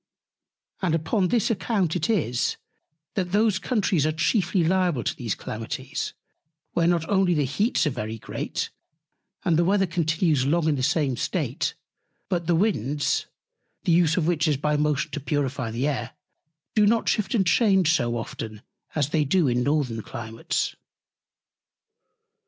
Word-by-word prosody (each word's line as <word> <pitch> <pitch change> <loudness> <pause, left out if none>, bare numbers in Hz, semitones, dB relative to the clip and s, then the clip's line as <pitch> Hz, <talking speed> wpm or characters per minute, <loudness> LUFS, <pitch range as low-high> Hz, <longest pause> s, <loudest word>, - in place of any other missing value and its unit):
And 175 -4 +2
upon 175 +5 +1
this 230 +2 +1
account 195 -5 0
it 180 +4 -1
is, 145 - +1 0.6
that 180 -3 -2
those 210 -1 +3
Countries 195 - +1
are 155 - +2
chiefly 175 +3 +1
liable 175 -6 +1
to - - -1
these 115 -5 -3
Calamities, 130 +6 -5 0.6
where 170 -1 +2
not 170 -2 +1
only 190 -3 +3
the 145 -2 +2
Heats 200 - +1
are 150 - +1
very 115 -3 -4
great, - - -4 0.7
and 170 -4 +3
the 170 - +4
Weather 195 +2 +3
continues 165 -4 +1
long 160 +4 +1
in 155 - +3
the 130 - -2
same 135 -1 +1
State; - - -1 0.5
but 175 -3 -1
the 175 - +3
Winds 150 - 0 0.6
(the - - +1
Use 170 -1 +4
of 170 - +2
which 165 -1 +1
is 150 -3 +2
by 150 +2 0
Motion 150 0 0
to 150 - -3
purify 140 -4 -1
the 120 +5 -1
Air) 125 -6 -2 0.6
do 210 -2 +4
not 230 +2 +2
shift 215 +4 +1
and 195 -4 +3
change 190 -4 +4
so 120 -6 0
often 110 -2 -6 0.3
as 145 -3 +1
they 155 -1 +2
do 160 +2 +2
in 125 -1 +1
Northern 135 -5 0
Climates. 115 0 -3
160 Hz, 155 wpm, -25 LUFS, 135-185 Hz, 0.7 s, the